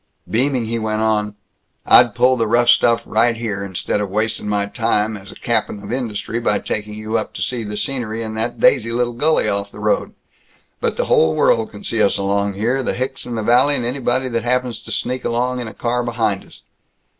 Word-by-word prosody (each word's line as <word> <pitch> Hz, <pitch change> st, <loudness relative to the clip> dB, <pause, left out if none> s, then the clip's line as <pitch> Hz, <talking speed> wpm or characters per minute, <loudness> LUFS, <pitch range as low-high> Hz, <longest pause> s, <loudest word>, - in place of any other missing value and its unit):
Beaming, 125 Hz, +1 st, 0 dB
he 115 Hz, +1 st, -2 dB
went 110 Hz, 0 st, -1 dB
on, 105 Hz, -1 st, 0 dB, 0.5 s
"I'd 120 Hz, -3 st, +6 dB
pull 130 Hz, +1 st, +4 dB
the 115 Hz, -3 st, 0 dB
rough 120 Hz, +2 st, +3 dB
stuff 115 Hz, 0 st, +4 dB
right 115 Hz, +1 st, +2 dB
here, 105 Hz, -4 st, -3 dB
instead 100 Hz, +1 st, -2 dB
of 100 Hz, -, -3 dB
wastin' 110 Hz, +1 st, -1 dB
my 100 Hz, -1 st, +1 dB
time 110 Hz, 0 st, 0 dB
as 100 Hz, -1 st, -9 dB
a -, -, -12 dB
cap'n 110 Hz, -3 st, -1 dB
of 105 Hz, +3 st, -5 dB
industry 115 Hz, -2 st, -3 dB
by 120 Hz, -, +1 dB
taking 105 Hz, 0 st, -4 dB
you 110 Hz, +1 st, -1 dB
up -, -, -6 dB
to -, -, -5 dB
see 125 Hz, -2 st, -1 dB
the 105 Hz, 0 st, -5 dB
scenery 115 Hz, -4 st, -2 dB
in 110 Hz, -1 st, -5 dB
that 110 Hz, +2 st, -3 dB
daisy 115 Hz, -4 st, +3 dB
little 120 Hz, 0 st, 0 dB
gully 155 Hz, +7 st, +2 dB
off 100 Hz, 0 st, -1 dB
the -, -, -13 dB
road; 105 Hz, 0 st, -1 dB, 0.6 s
but -, -, -1 dB
the -, -, 0 dB
whole 80 Hz, 0 st, +3 dB
world 110 Hz, +6 st, +2 dB
can 105 Hz, -, -12 dB
see 115 Hz, -, 0 dB
us 100 Hz, -, +3 dB
along 100 Hz, +1 st, 0 dB
here 120 Hz, +7 st, 0 dB
the -, -, -2 dB
hicks 130 Hz, +2 st, -4 dB
in 120 Hz, -, -4 dB
the 110 Hz, -, -2 dB
valley 125 Hz, +6 st, +4 dB
and 120 Hz, -, -2 dB
anybody 130 Hz, 0 st, -1 dB
that 115 Hz, -2 st, -2 dB
happens 125 Hz, 0 st, -1 dB
to -, -, -9 dB
sneak 125 Hz, +1 st, -2 dB
along 125 Hz, +2 st, -1 dB
in 120 Hz, -, -4 dB
a 110 Hz, -, -8 dB
car 120 Hz, +1 st, -1 dB
behind 115 Hz, -4 st, -1 dB
us. -, -, -13 dB
115 Hz, 220 wpm, -19 LUFS, 105-120 Hz, 0.6 s, I'd